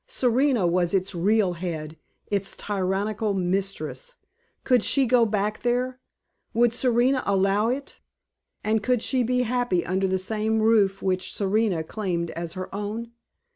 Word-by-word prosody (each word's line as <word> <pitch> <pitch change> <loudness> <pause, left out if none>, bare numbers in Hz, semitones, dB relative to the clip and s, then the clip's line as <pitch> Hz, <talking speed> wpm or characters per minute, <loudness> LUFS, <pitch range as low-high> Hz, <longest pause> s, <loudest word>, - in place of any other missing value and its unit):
Serena 255 - +2
was 175 +1 +1
its 190 +1 0
real 190 +2 +2
head, 165 -3 -5 0.4
its 200 -1 -1
tyrannical 205 +2 -1
mistress. 195 - -2 0.5
Could 250 -4 +3
she 275 -2 +3
go 240 -1 +4
back 210 0 -1
there? 250 +1 0 0.6
Would 235 0 +4
Serena 250 +2 +2
allow 195 +2 +2
it? 265 +3 -4 0.6
And 215 0 +1
could 245 +1 +1
she 260 -2 +1
be 250 +1 +1
happy 245 -7 0
under 190 +2 0
the 190 0 +1
same 215 +3 -1
roof 210 -3 +3
which 185 -1 -1
Serena 200 -4 0
claimed 170 -2 -3
as 170 0 -5
her 185 0 -6
own? 210 +3 -4
210 Hz, 140 wpm, -25 LUFS, 190-240 Hz, 0.6 s, go